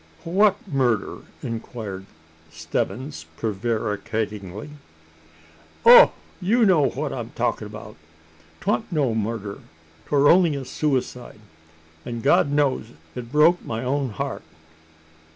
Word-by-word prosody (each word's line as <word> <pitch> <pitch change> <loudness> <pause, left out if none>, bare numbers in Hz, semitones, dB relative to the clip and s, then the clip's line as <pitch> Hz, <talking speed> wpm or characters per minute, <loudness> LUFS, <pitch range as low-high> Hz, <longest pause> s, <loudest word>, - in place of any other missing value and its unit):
"What 195 +4 +2
murder?" 130 - 0 0.2
inquired 110 -4 -6 0.4
Stebbins, 100 - -4
prevaricatingly. 105 0 -3 1.1
"Oh! 485 +1 +9 0.3
you 225 +6 +3
know 165 -8 +4
what - - -4
I'm - - -5
talkin' - - -1
about! - - -10 0.7
'Twant 120 - -1
no 140 -8 +1
murder. 110 -2 -3 0.5
'Twar 145 -1 +3
only 170 -3 +5
a 135 -1 -5
suicide; 130 -4 -2 0.6
an' 120 -1 -5
God 140 - +4
knows 145 -6 +1 0.3
it 120 -1 -8
broke 160 +4 +4
my 115 +1 -4
own 135 +1 -1
heart." 105 - -4
125 Hz, 105 wpm, -23 LUFS, 110-150 Hz, 1.1 s, Oh